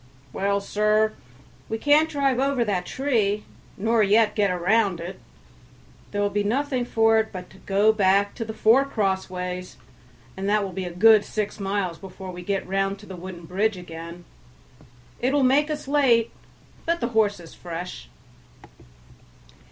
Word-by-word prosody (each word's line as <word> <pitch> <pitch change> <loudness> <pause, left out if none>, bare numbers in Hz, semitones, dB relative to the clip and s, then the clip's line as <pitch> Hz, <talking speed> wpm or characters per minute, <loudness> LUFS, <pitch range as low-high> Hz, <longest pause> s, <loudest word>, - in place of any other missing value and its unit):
"Well, 200 +1 0
sir, 215 +2 +1 0.6
we 225 - -2
can't 295 +5 +4
drive 275 -4 +1
over 270 -3 +1
that 185 -4 -1
tree, 220 -7 0 0.3
nor 225 +3 +2
yet 210 +1 +4
get 205 -2 +2
round 185 +1 +1
it; 175 +3 -7 0.9
there 205 - -2
will 205 - 0
be 205 0 0
nothing 255 +3 0
for 225 -1 +3
it, 220 - -2
but 180 -2 -8
to 190 - -16
go 205 +3 +3
back 200 -1 +2
to 235 - -4
the 220 - -6
four 230 +5 +5
crossways, 185 -6 -3 0.6
and 195 +1 -3
that 210 0 +2
will 195 - -4
be 185 +1 -4
a - - -4
good 215 +4 +6
six 215 0 -4
miles 195 -4 -2
before 190 -1 -9
we 180 0 -8
get 195 +2 -2
round 195 +1 0
to 205 - -14
the 190 - -8
wooden 175 -1 -9
bridge 200 +4 0
again; 170 0 -9 0.9
it 255 +3 0
will 285 -1 +3
make 280 +4 +3
us 300 -2 -4
late, 260 -6 +3 0.6
but 340 0 +1
the 235 - -1
horse 215 -4 +1
is 170 -2 -12
fresh." 170 - -7
205 Hz, 165 wpm, -24 LUFS, 190-230 Hz, 0.9 s, good